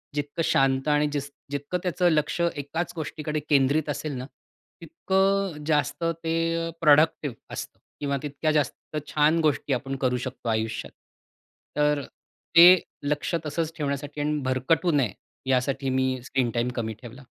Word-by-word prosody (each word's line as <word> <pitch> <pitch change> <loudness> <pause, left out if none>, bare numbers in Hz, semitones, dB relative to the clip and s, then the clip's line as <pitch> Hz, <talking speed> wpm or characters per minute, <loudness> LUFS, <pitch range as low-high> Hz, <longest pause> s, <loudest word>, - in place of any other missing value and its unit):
जितकं 145 +2 -2
शांत 135 +1 +2
आणि 150 0 +3
जिस 145 -1 -3 0.2
जितकं 145 +5 -2
त्याचं 180 0 +2
लक्ष 155 +2 0
एकाच 165 0 -2
गोष्टीकडे 155 -1 -3
केंद्रित 145 +2 +3
असेल 145 +1 -3
ना, 125 - -5 0.6
तितकं 190 0 0
जास्त 150 +1 0 0.2
ते 165 0 0
प्रॉडक्टिव्ह 150 -3 +4 0.2
असतं - - -7 0.2
किंवा 140 -1 -1
तितक्या 150 +2 -1
जास्त 150 0 -2
छान 155 +2 +3
गोष्टी 145 -1 0
आपण 135 +2 -2
करू 125 -1 +2
शकतो 115 - -6
आयुष्यात. 110 0 -2 0.9
तर 150 -1 +2 0.5
ते 175 +2 +10 0.2
लक्ष 150 +4 -1
तसंच 160 +1 -2
ठेवण्यासाठी 145 0 -3
आणि 150 0 0
भरकटू 155 +7 +2
नये 135 - +1 0.4
यासाठी 135 +1 +1
मी 130 -1 0
स्क्रीन 130 -2 0
टाईम 120 +1 0
कमी 110 -2 -2
ठेवला. 125 +2 -11
145 Hz, 140 wpm, -26 LUFS, 135-160 Hz, 0.9 s, ते